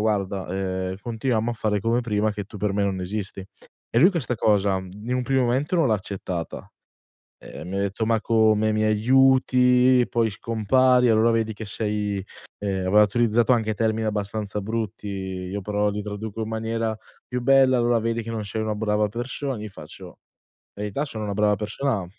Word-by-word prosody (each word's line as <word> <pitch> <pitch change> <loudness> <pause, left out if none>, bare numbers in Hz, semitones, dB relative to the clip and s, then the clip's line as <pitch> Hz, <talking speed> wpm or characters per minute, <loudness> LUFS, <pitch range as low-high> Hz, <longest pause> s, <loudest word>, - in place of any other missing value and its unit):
"Guarda, 100 -3 -1
ehm, 95 0 -3
continuiamo 115 +1 -1
a - - -3
fare 105 -2 -1
come 115 +4 +1
prima, 110 -2 0
che 105 -1 -5
tu 105 - -12
per 105 0 0
me 100 - +1
non 95 -2 -1
esisti". 100 +1 -4 0.5
E 115 - +2
lui 180 +7 +7
questa 150 -9 -2
cosa 100 -3 +2
in 105 +6 -6
un 125 - 0
primo 135 +1 +1
momento 135 +8 0
non 165 -4 +3
l'ha 110 - +3
accettata, 95 -4 -5 0.7
ehm, - - -10
mi 95 - -4
ha - - 0
detto: 100 +2 -1
"Ma 115 0 +1
come, 110 -1 +3
mi 110 0 0
aiuti 125 +2 +4
poi 115 -1 +2
scompari, 125 +4 +2
allora 110 +1 +4
vedi 115 -1 0
che 110 - -7
sei", 105 -2 -2 0.3
ehm, 95 -2 -2
aveva 105 +3 +6
utilizzato 115 +3 +2
anche 110 -3 +1
termini 110 +1 0
abbastanza 105 0 -2
brutti. 110 0 -4
Io 95 0 -4
però 105 +1 0
li 105 +1 -4
traduco 105 +1 -6
in 110 - -4
maniera 115 0 -2 0.3
più 125 -1 -2
bella: 135 0 +5
"Allora 120 -1 +2
vedi 115 +1 -1
che 115 - -6
non 110 -2 -3
sei 110 +2 -3
una 110 -1 -1
brava 105 0 0
persona", 130 +4 -4
io 110 - -5
faccio: 90 0 -11 0.6
"Verità, 105 +7 -3
sono 110 -7 -4
una 100 - -3
brava 105 0 +3
persona" 105 0 -2
110 Hz, 185 wpm, -24 LUFS, 100-115 Hz, 0.7 s, lui